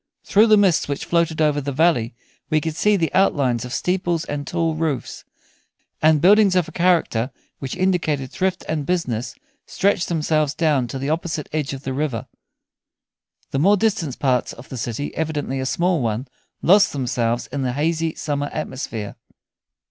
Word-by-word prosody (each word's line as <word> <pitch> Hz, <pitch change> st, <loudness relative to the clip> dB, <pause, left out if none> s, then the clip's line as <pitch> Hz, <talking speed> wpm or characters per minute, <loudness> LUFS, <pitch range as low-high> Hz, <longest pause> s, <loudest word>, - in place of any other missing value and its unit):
Through 215 Hz, +3 st, +4 dB
the 215 Hz, -1 st, +6 dB
mists 195 Hz, -5 st, +3 dB
which 140 Hz, 0 st, -3 dB
floated 170 Hz, -2 st, +1 dB
over 145 Hz, -1 st, +2 dB
the 140 Hz, +1 st, -3 dB
valley 135 Hz, -6 st, +2 dB, 0.3 s
we 155 Hz, -1 st, +3 dB
could 155 Hz, 0 st, -4 dB
see 210 Hz, +5 st, +3 dB
the 165 Hz, -3 st, -1 dB
outlines 135 Hz, -11 st, +2 dB
of 125 Hz, -, -8 dB
steeples 175 Hz, 0 st, -1 dB
and 145 Hz, -1 st, -5 dB
tall 165 Hz, -2 st, 0 dB
roofs; 155 Hz, -4 st, -3 dB, 0.8 s
and 155 Hz, 0 st, +5 dB
buildings 200 Hz, +3 st, +5 dB
of 180 Hz, -3 st, +2 dB
a -, -, -9 dB
character 165 Hz, -9 st, +1 dB, 0.3 s
which 135 Hz, -2 st, -5 dB
indicated 160 Hz, -8 st, 0 dB
thrift 185 Hz, -1 st, -1 dB
and 150 Hz, -3 st, -2 dB
business 125 Hz, -10 st, -2 dB, 0.3 s
stretched 200 Hz, -2 st, +1 dB
themselves 155 Hz, -3 st, 0 dB
down 150 Hz, -7 st, +1 dB
to 135 Hz, -, -5 dB
the 135 Hz, +3 st, -2 dB
opposite 160 Hz, -2 st, -2 dB
edge 150 Hz, -4 st, -1 dB
of 135 Hz, 0 st, -7 dB
the 130 Hz, -, -3 dB
river. 135 Hz, -5 st, -2 dB, 1.3 s
The 135 Hz, -, 0 dB
more 200 Hz, +7 st, +4 dB
distant 185 Hz, -, 0 dB
parts 130 Hz, -3 st, 0 dB
of 120 Hz, -, -13 dB
the -, -, -6 dB
city, 120 Hz, +4 st, -4 dB
evidently 150 Hz, -4 st, -2 dB
a 130 Hz, -, -2 dB
small 175 Hz, +1 st, +1 dB
one, 115 Hz, +3 st, -2 dB, 0.4 s
lost 195 Hz, +3 st, +5 dB
themselves 120 Hz, -3 st, -1 dB
in 140 Hz, +1 st, -3 dB
the 125 Hz, -2 st, -1 dB
hazy 160 Hz, +3 st, -1 dB
summer 145 Hz, -1 st, -2 dB
atmosphere. 125 Hz, -8 st, -5 dB
155 Hz, 170 wpm, -21 LUFS, 135-170 Hz, 1.3 s, the